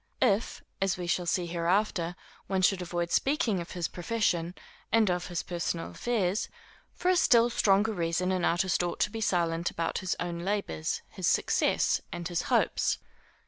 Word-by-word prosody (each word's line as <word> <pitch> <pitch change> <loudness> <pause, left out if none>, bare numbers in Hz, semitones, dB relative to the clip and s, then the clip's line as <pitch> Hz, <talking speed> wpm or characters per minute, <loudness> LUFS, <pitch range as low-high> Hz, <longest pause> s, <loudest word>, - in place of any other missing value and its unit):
If, 205 +3 +1 0.2
as 195 -2 +1
we 180 - -4
shall 175 0 0
see 180 +1 +1
hereafter, 175 +1 0 0.3
one 190 -1 0
should 185 0 +3
avoid 175 -1 -3
speaking 270 - +1
of 170 - -6
his 175 -2 -2
profession, 175 -3 -1 0.4
and 220 -4 +4
of 180 0 -2
his 175 -2 -3
personal 170 -1 -3
affairs, 210 -5 -1 0.5
for 360 - 0
a 370 - +4
still 240 -7 +5
stronger 205 +1 +3
reason, 175 0 0
an 185 -2 0
artist 175 +2 +2
ought 175 -1 -2
to 205 - +2
be 225 0 -5
silent 170 -4 +1
about 165 - -2
his 185 -1 -1
own 175 -1 -3
labors, 185 - -2
his - - -3
success, - - +2
and 175 0 -4
his 175 -1 0
hopes. - - +2
180 Hz, 170 wpm, -29 LUFS, 170-205 Hz, 0.5 s, still